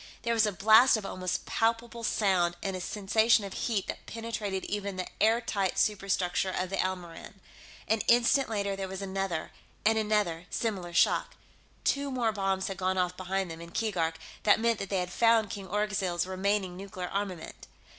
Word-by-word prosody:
There 235 0 +1
was 225 -2 +4
a - - 0
blast 220 +6 +6
of 210 - -6
almost 185 -1 -3
palpable 230 +1 -1
sound, 185 -6 +2
and 195 -1 -2
a 185 - -4
sensation 215 +3 +2
of 195 - -7
heat 215 -5 -1
that - - -7
penetrated 220 -4 -4
even 200 -1 -3
the 185 -1 -3 0.2
airtight 215 -4 +2
superstructure 195 -2 +1
of 185 0 -2
the 195 - -1
Elmoran. 180 -1 -4 0.5
An 220 0 +2
instant 240 +3 +4
later, 200 -2 -1
there 195 0 -4
was 190 +1 -6
another, 195 -4 -3 0.3
and 220 +1 +4
another, 210 -6 0
similar 195 -7 -2
shock. 170 - +2 0.5
Two 280 0 +1
more 245 -4 0
bombs 195 -2 -1
had 195 -2 -5
gone 185 0 0
off 180 0 0
behind 185 -1 -2
them, 165 0 -8
in 170 - -9
Keegark; 170 -6 -1 0.3
that 205 - +4
meant 230 -1 +1
that 195 - -5
they 195 - 0
had 180 0 -4
found 225 0 +3
King 195 -1 -6
Orgzild's 195 -3 0
remaining 190 0 -1
nuclear 185 -1 -6
armament. 195 -4 -5
195 Hz, 175 wpm, -29 LUFS, 185-220 Hz, 0.5 s, blast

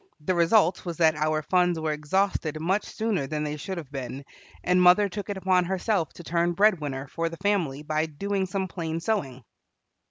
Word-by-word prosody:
The 185 +5 0
result 175 +2 +3
was 170 -3 -5
that 160 -2 +4
our 155 0 0
funds 180 0 +2
were 160 -1 -1
exhausted 155 0 -1
much 190 +6 0
sooner 215 -10 -2
than 150 +1 -3
they 150 0 -3
should 185 +5 -5
have 150 -5 -8
been, 135 0 -6 0.4
and 180 0 +3
mother 180 +3 +6
took 205 +2 -6
it 200 - -3
upon 185 -1 +2
herself 190 -1 -1
to 175 - -11
turn 170 +1 0
bread 200 0 +4
winner 135 -2 -4
for 165 +4 -2
the 165 - -9
family 175 -8 0
by 155 +1 0
doing 195 +5 -2
some 190 +1 -2
plain 165 -2 -4
sewing. 140 - -2
170 Hz, 195 wpm, -26 LUFS, 155-190 Hz, 0.4 s, mother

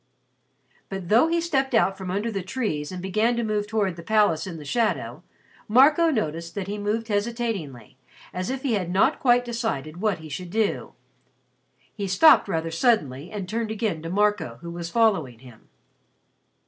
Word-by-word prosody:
But 195 -3 -6
though 230 +9 +5
he 335 +1 +1
stepped 270 -7 0
out 195 -3 +3
from 190 -2 -7
under 205 +5 -1
the 195 -2 -3
trees 185 - -3
and 180 -1 -6
began 215 +5 +1
to 235 - -1
move 210 -1 -1
towards 205 -5 -1
the - - -7
palace 205 -4 +2
in 170 -3 -6
the 150 - -10
shadow, 230 - -1 0.5
Marco 295 +9 +5
noticed 170 - -2
that 200 -2 -3
he 205 +2 -5
moved 215 +2 -2
hesitatingly, 205 - -3 0.4
as 185 +1 -3
if 265 0 -4
he 265 -5 0
had 185 -5 -1
not 190 +3 +2
quite 245 -1 +3
decided 220 - -3
what 215 -3 +1
he 160 -1 -11
should 175 +4 -6
do. 215 +2 -1 1.0
He 200 -2 -4
stopped 200 +12 +6
rather 165 -3 -2
suddenly 165 - +1
and 205 -4 -5
turned 225 +2 -2
again 215 -7 -2
to 165 - -6
Marco, 205 - 0
who 170 - -6
was 170 0 -5
following 180 - +1
him. 120 -2 -17
205 Hz, 175 wpm, -24 LUFS, 170-230 Hz, 1.0 s, stopped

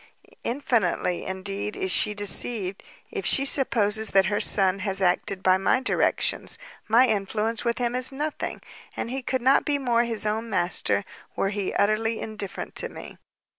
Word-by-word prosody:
infinitely, 230 -9 0
indeed, 195 +2 -4
is 190 - -2
she 210 - +3
deceived, 205 -1 0 0.3
if 410 -3 -4
she 275 - +3
supposes 220 -6 +3
that 195 -1 +4
her 205 +1 0
son 195 -1 +3
has 195 -1 -3
acted 185 +1 0
by 185 0 +4
my 195 - +2
directions; 260 - +1 0.3
my 235 +4 +5
influence 215 +1 -1
with 235 0 -1
him 240 -1 -1
is 255 +1 0
nothing, 295 +3 -4 0.4
and 235 - -3
he 265 +1 -3
could 260 -1 -2
not 265 +2 +4
be 290 -1 0
more 240 -4 +1
his 225 -2 -2
own 220 +2 -2
master, 185 +1 0 0.3
were 195 - 0
he 200 -2 -3
utterly 220 +2 +1
indifferent 210 -3 -6
to - - -2
me. - - -11
215 Hz, 165 wpm, -25 LUFS, 195-245 Hz, 0.4 s, my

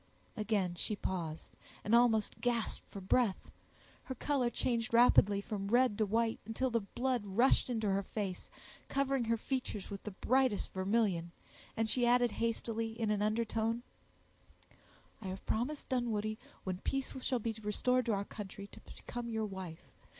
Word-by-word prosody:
Again 210 -5 0
she 190 +4 -2
paused, 170 -5 -4 0.3
and 210 - 0
almost 230 -3 +4
gasped 240 -2 0
for 200 - -7
breath; 195 +2 +1 0.5
her 260 - -4
color 260 -1 +1
changed 235 -1 0
rapidly 205 -4 +6
from 200 -2 -4
red 245 0 +4
to 215 - +3
white, 225 +2 +1
until 235 +4 -1
the 230 - +3
blood 245 +3 -1
rushed 225 +7 +3
into 225 -3 0
her 195 0 +2
face, 195 -2 -4 0.4
covering 275 -2 +1
her 230 0 +2
features 235 -6 -3
with 200 - -5
the - - -5
brightest 250 +2 +1
vermilion; 190 -3 +1 0.5
and 225 0 +2
she 240 +2 +2
added 245 -1 +4
hastily, 230 0 -2
in 220 -2 +1
an 205 -1 +1
undertone, 225 +2 0 1.4
"I 195 - -6
have 190 +1 -6
promised, 255 +7 -1
Dunwoodie, 215 -4 0 0.2
when 185 -1 -3
peace 270 +5 -2
shall 255 - +1
be 225 -1 -2
restored 245 +4 +1
to 225 - +3
our 200 0 -1
country, 200 -1 -7
to - - -12
become 240 -1 -7
your 220 -1 -1
wife. 190 -5 -8
225 Hz, 155 wpm, -34 LUFS, 200-240 Hz, 1.4 s, rapidly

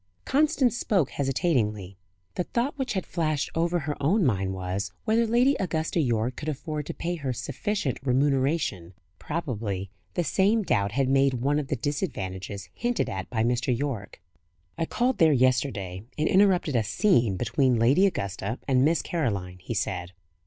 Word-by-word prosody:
Constance 290 -3 +2
spoke 190 - +1
hesitatingly. 120 - 0 0.4
The 180 - -2
thought 250 +5 -1
which 265 -4 -2
had 190 -3 -2
flashed 155 -4 -1
over 170 +2 +1
her 150 0 -3
own 175 +7 +3
mind 95 -6 +1
was, 95 +2 -3
whether 225 +1 +3
Lady 245 +5 +4
Augusta 165 -2 -1
Yorke 120 -3 0
could 155 - -4
afford 150 0 -4
to - - -4
pay 175 +1 -3
her 140 -4 -3
sufficient 140 - -2
remuneration. 135 - 0 0.2
Probably 110 - -3 0.2
the 175 - +1
same 200 +7 +2
doubt 100 - +1
had 135 +1 +1
made 135 0 +3
one 140 +5 +1
of 145 - -4
the 140 - -1
"disadvantages" 100 - -4
hinted 240 0 -1
at 95 0 -5
by 110 -2 0
Mr. 120 +1 +1
Yorke. 120 -8 -4 0.6
"I 165 - -1
called 250 +1 0
there 160 -2 +6
yesterday, 120 -8 +1 0.2
and 155 +1 +1
interrupted 185 -7 +3
a 115 - +3
'scene' 120 - +2
between 120 +4 +2
Lady 135 - +5
Augusta 100 - -3
and 130 -2 +3
Miss 155 -1 +2
Caroline," 100 - -2
he 115 +6 -5
said. 90 -3 -2
135 Hz, 160 wpm, -26 LUFS, 110-170 Hz, 0.6 s, there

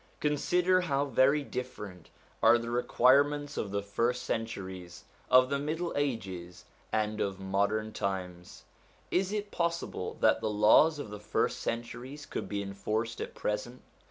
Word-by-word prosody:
Consider 180 +5 +2
how 140 -5 0
very 140 +2 +3
different 105 -10 -7 0.3
are 120 - +7
the 115 0 -5
requirements 145 +4 +3
of 105 - -2
the 100 0 -2
first 115 +5 0
centuries, 95 -6 -5 0.3
of 130 +1 +6
the 140 - +1
middle 160 +4 -2
ages, 95 -11 -3 0.3
and 110 0 0
of 95 -1 -2
modern 100 +3 0
times. 90 -2 -4 0.5
Is 190 +2 +1
it 210 -1 -3
possible 170 0 -2
that - - +4
the 110 - 0
laws 105 +10 +5
of 140 -8 -6
the 105 - -7
first 105 - -1
centuries 120 +5 -5
could - - -5
be 100 -1 -2
enforced 105 +4 -3
at - - -6
present 115 +4 -3
115 Hz, 145 wpm, -30 LUFS, 100-145 Hz, 0.5 s, are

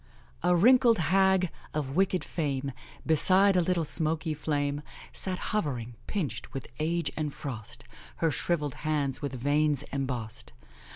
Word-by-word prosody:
"A 180 +1 +3
wrinkled 235 +4 +5
hag, 190 +1 +3 0.2
of 140 -2 -2
wicked 185 0 +2
fame, 140 -4 -2 0.3
Beside 185 +5 +5
a 180 - +4
little 170 -1 0
smoky 160 +1 +1
flame, 145 -1 -1 0.3
Sat 185 -1 -3 0.2
hovering, 125 - -2
pinched 185 -10 -4
with 135 - -6
age 170 +2 -1
and 150 -2 -2
frost, 125 -8 -7 0.3
Her 165 -1 +1
shrivelled 150 -4 -1
hands 145 -3 -1
with 140 -3 -4
veins 145 +2 +1
embossed. 125 -5 -4
155 Hz, 130 wpm, -28 LUFS, 140-180 Hz, 0.3 s, wrinkled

